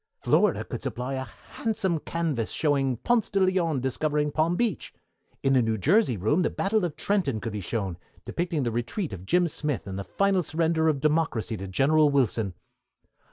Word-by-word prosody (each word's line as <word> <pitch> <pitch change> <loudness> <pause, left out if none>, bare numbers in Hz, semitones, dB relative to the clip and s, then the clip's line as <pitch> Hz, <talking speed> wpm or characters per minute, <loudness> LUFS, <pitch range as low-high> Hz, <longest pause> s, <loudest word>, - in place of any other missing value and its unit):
Florida - - +2
could - - -6
supply 125 +2 -4
a 130 0 -3 0.3
handsome 205 -7 -1
canvas 155 -9 -2
showing 135 -5 +1
Ponce 235 - +1
de 200 - 0
Leon 180 -7 +2
discovering 150 +3 0
Palm 160 +3 +1
Beach. 235 +1 -2 0.5
In 135 - +3
the 130 - +5
New 110 -1 0
Jersey 155 - +3
room 125 - +2
the - - +2
Battle 210 +1 0
of 170 -4 -2
Trenton 180 - 0
could 105 +1 -5
be 105 - -3
shown, 95 -3 -3 0.3
depicting 170 -4 -2
the 120 - -1
retreat 120 - -3
of 95 0 -9
Jim 180 - +3
Smith, 150 -4 -2
and 95 -1 -5
the - - -3
final 195 - +1
surrender 160 0 +1
of 145 -4 +1
Democracy 150 -7 0
to 95 -1 -6
General 145 +10 +3
Wilson. 115 -8 +1
150 Hz, 180 wpm, -26 LUFS, 120-175 Hz, 0.5 s, the